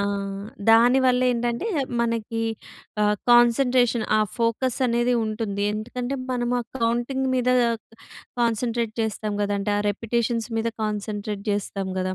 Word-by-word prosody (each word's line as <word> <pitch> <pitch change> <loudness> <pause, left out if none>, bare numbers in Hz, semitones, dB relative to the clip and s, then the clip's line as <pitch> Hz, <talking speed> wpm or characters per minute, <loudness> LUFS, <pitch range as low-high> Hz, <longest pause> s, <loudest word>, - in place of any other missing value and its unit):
ఆ! - - +1 0.7
దానివల్ల 250 +2 +5
ఏంటంటే 240 - -2 0.3
మనకి 230 -1 -1 0.6
ఆహ్, 210 0 +3
కాన్సంట్రేషన్ 240 0 +4
ఆ - - +3 0.2
ఫోకస్ 230 +3 0
అనేది 240 +1 +1
ఉంటుంది. 215 -2 -3
ఎందుకంటే, 245 +4 -4 0.2
మనము 245 0 0
ఆ - - -4 0.2
కౌంటింగ్ 240 +3 0
మీద 250 0 +1 0.9
కాన్సంట్రేట్ 230 -1 0
చేస్తాం 215 -1 -2
కదండీ! 205 0 -1
ఆ - - +1
రిపిటిషన్స్ 230 +1 -1
మీద 230 - 0 0.2
కాన్సంట్రేట్ 210 -1 -4
చేస్తాం 200 -1 -2
కదా! 185 0 -1
230 Hz, 120 wpm, -24 LUFS, 215-245 Hz, 0.9 s, దానివల్ల